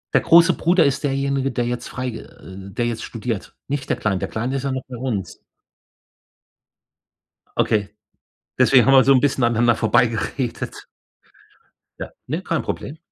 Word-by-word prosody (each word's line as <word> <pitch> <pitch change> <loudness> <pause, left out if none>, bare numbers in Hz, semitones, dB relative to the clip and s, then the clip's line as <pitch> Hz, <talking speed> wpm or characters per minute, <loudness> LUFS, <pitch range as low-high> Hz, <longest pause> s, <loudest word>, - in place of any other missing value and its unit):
Der - - +5
große 170 0 +6
Bruder 170 -1 +3
ist 140 +2 0
derjenige, 135 -1 -1
der 120 -1 -1
jetzt 120 0 -4
freig 125 -2 -4
äh, - - -9 0.4
der 120 +4 -2
jetzt 115 -1 -3
studiert. 115 -3 -5
Nicht 140 -1 -4
der - - 0
Kleine. 100 -3 -1
Der - - -3
Kleine 125 +5 -3
ist 135 - -5
ja 140 - -1
noch 130 -1 -3
bei 125 - -8
uns. 115 -6 -4 2.2
Okay, 105 -1 0 0.6
deswegen 130 -3 +5
haben 135 - +5
wir 130 -1 +7
so 135 - +5
'n 130 - +4
bisschen 135 -2 +1
aneinander 120 0 +3
vorbeigeredet. 115 +2 -1 1.1
Ja, - - -6 0.2
ne, - - -3
kein - - -1
Problem. 150 - -5
125 Hz, 160 wpm, -21 LUFS, 115-135 Hz, 2.2 s, wir